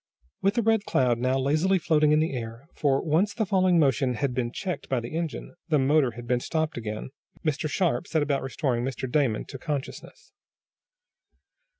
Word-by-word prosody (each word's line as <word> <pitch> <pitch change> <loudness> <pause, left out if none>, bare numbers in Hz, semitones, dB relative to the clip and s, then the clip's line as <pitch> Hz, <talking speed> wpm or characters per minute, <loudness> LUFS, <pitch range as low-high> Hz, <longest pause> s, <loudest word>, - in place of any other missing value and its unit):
With 195 +3 +2
the 235 - +1
Red 225 -1 +3
Cloud 125 -3 +2
now 130 +2 +1
lazily 155 +8 +2
floating 155 -3 +3
in 150 - +4
the 160 -1 0
air, 115 +2 -6
for, 140 -2 +1
once 170 +7 +1
the 220 -2 0
falling 185 -2 +3
motion 135 -4 +2
had 135 +2 -1
been 120 -2 -1
checked 180 +6 -5
by 130 - +1
the 120 +6 -6
engine, 165 -2 -4
the 155 -3 +3
motor 135 -2 +3
had 120 0 -8
been 125 +1 +1
stopped 160 +4 -2
again, 110 +1 -5 0.3
Mr. 155 0 0
Sharp 175 +1 0
set 160 -3 +1
about 140 -1 0
restoring 130 -2 -1
Mr. 130 0 -3
Damon 125 -4 +1
to 135 - -9
consciousness. 145 -1 -6
145 Hz, 185 wpm, -26 LUFS, 125-160 Hz, 0.3 s, in